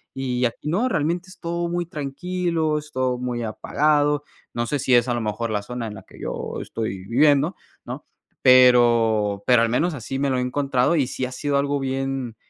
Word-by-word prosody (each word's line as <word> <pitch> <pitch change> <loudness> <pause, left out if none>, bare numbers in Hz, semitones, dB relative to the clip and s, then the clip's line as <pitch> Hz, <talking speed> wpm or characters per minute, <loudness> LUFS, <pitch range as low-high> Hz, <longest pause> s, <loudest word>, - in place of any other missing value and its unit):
y 125 -2 -1
aquí 120 +5 -3
no, 210 +11 +1
realmente 170 -1 -1
es 185 - -15
todo 170 +1 -2
muy 175 0 -2
tranquilo, 160 +1 -2
es 150 0 -7
todo 130 -1 0
muy 125 -1 -3
apagado. 145 +5 +1 0.3
No 120 0 -1
sé 145 - 0
si 130 -1 +1
es 120 +1 +4
a - - +1
lo 120 - -2
mejor 110 +2 -2
la 105 -1 -2
zona 120 +1 -5
en 105 - -7
la 95 - -11
que - - -17
yo - - -4
estoy 100 -4 -4
viviendo, 145 - +3 0.3
¿no? - - -7 0.4
Pero, 120 -5 +5
pero 125 -2 +5
al 115 - +1
menos 160 +9 +1
así 135 +1 -5
me 140 0 +1
lo 130 - +1
he - - 0
encontrado 130 +3 +1
y 135 - +2
sí 130 - -3
ha 125 - -6
sido 140 +2 -1
algo 140 0 0
bien 135 -3 -3
130 Hz, 205 wpm, -23 LUFS, 120-150 Hz, 0.4 s, Pero